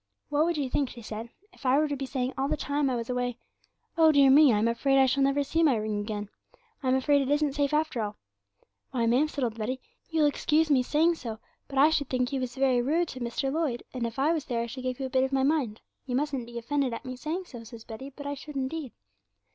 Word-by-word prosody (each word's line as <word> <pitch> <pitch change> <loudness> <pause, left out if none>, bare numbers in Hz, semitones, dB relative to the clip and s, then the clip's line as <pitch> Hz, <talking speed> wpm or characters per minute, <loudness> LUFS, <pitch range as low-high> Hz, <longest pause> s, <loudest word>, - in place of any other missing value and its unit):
"What 295 +2 +2
would 340 -1 0
you 285 -3 0
think," 270 +1 0
she 235 - -11
said, 220 +2 -6 0.2
"if - - -18
I 260 +1 +4
were 305 +1 +3
to 290 - -2
be 270 -1 -4
saying 260 -1 -2
all 270 0 0
the - - -1
time 285 -1 0
I 255 - 0
was 230 -1 -3
away 245 -1 -2 0.6
Oh, 320 -2 +6
dear 280 -2 +6
me, 290 0 +7
I'm 215 +1 +2
afraid 270 +4 +2
I 265 - +6
shall 270 +2 +1
never 275 +1 +3
see 325 +4 0
my 295 -6 +4
ring 215 -1 -2
again; 205 -1 -4 0.5
I'm 260 -2 +2
afraid 285 +2 +3
it 270 - -2
isn't 290 -1 +2
safe 285 -1 0
after 300 -5 0
all?" 210 -1 -3 0.7
'"Why, 240 -3 0
ma'am," 250 +6 +3
said 290 -3 -4
old 230 -2 -2
Betty, 255 +5 -2 0.3
"you'll 320 -2 +2
excuse 305 +1 +2
me 265 -3 +5
saying 310 +6 +3
so, 225 -5 -6 0.3
but 275 - -6
I 295 +4 +6
should 285 -4 0
think 250 +1 0
you 270 - 0
was 250 -1 -4
very 265 -2 +3
rude 315 +6 +1
to 260 - -7
Mr. 250 +3 -2
Lloyd, 300 -7 -1
and 245 -2 -2
if 230 - -8
I 290 +5 +3
was 315 -4 -2
there 235 -3 -1
I - - -3
should 255 +3 -7
give 255 0 -3
you 270 - -2
a - - -4
bit 260 -1 +3
of 265 - -1
my 270 -1 +2
mind; 270 -7 0 0.3
you 250 - -1
mustn't 270 -3 -1
be 240 0 -8
offended 255 +1 -1
at - - -9
me 255 0 -5
saying 320 +8 -4
so," 240 -8 -10
says 225 0 -11
Betty, 235 +4 -8
"but 285 +1 -11
I 285 - -2
should 285 +1 -9
indeed." 270 0 -3
265 Hz, 265 wpm, -28 LUFS, 245-290 Hz, 0.7 s, me